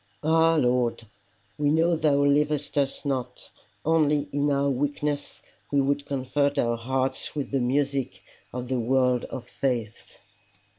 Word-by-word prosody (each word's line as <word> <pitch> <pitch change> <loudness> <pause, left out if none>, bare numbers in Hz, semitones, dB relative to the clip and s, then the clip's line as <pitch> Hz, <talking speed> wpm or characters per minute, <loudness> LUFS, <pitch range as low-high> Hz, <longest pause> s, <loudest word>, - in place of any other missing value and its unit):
Ah 165 +1 +4
Lord! 125 -5 +1 0.6
we 145 -1 +2
know 165 +3 +3
thou 145 -3 +2
leavest 145 0 +1
us 140 0 -1
not, 125 -3 -4 0.3
only 150 -2 +2
in 145 +1 +1
our 140 0 +2
weakness 145 +2 -2 0.3
we 140 - +3
would 140 +1 0
comfort 140 +1 0
our 120 0 +1
hearts 130 +5 -2
with 145 -2 -3
the 135 - +1
music 135 -6 -1 0.3
of 125 0 -5
the 130 0 -1
words 125 +1 +2
of 125 -2 -7
faith. 120 -5 -3
140 Hz, 140 wpm, -26 LUFS, 125-145 Hz, 0.6 s, Ah